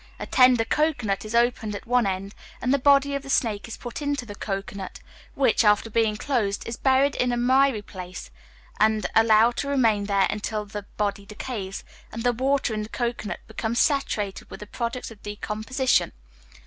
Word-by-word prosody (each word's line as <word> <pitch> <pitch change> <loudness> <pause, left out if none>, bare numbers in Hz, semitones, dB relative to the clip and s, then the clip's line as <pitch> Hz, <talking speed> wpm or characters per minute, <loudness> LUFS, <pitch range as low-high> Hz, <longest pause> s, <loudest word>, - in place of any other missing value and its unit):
A - - -5
tender 250 -3 +5
cocoanut 250 -10 0
is 215 +2 -4
opened 235 -3 +1
at - - -8
one 245 -2 +2
end, 195 +1 -3 0.3
and 250 +2 +1
the 280 - +2
body 280 +1 +4
of 280 - -2
the 275 - -11
snake 220 -6 0
is 225 - -7
put 240 +4 -7
into 285 -3 -2
the 205 - -8
cocoanut, 195 -1 -5 0.4
which, 255 -5 +3
after 210 +1 +3
being 220 -1 +1
closed, 215 -6 -1
is 230 - -3
buried 270 +2 +3
in 250 0 0
a 240 - 0
miry 260 -2 +3
place, 185 -2 -9 0.5
and 215 0 +3
allowed 225 +1 +5
to 280 - -2
remain 225 -7 +2
there 200 -1 +2
until 210 0 -3
the 205 0 -7
body 200 -1 -2
decays, 210 -2 -6 0.3
and 225 +1 -5
the 245 0 +2
water 265 0 0
in 215 - -2
the 210 - -6
cocoanut 235 -3 -3
becomes 230 +1 -3
saturated 220 -10 0
with - - -9
the - - -6
products 235 +3 -4
of 215 - -14
decomposition. 215 +5 -1
225 Hz, 185 wpm, -25 LUFS, 210-255 Hz, 0.5 s, tender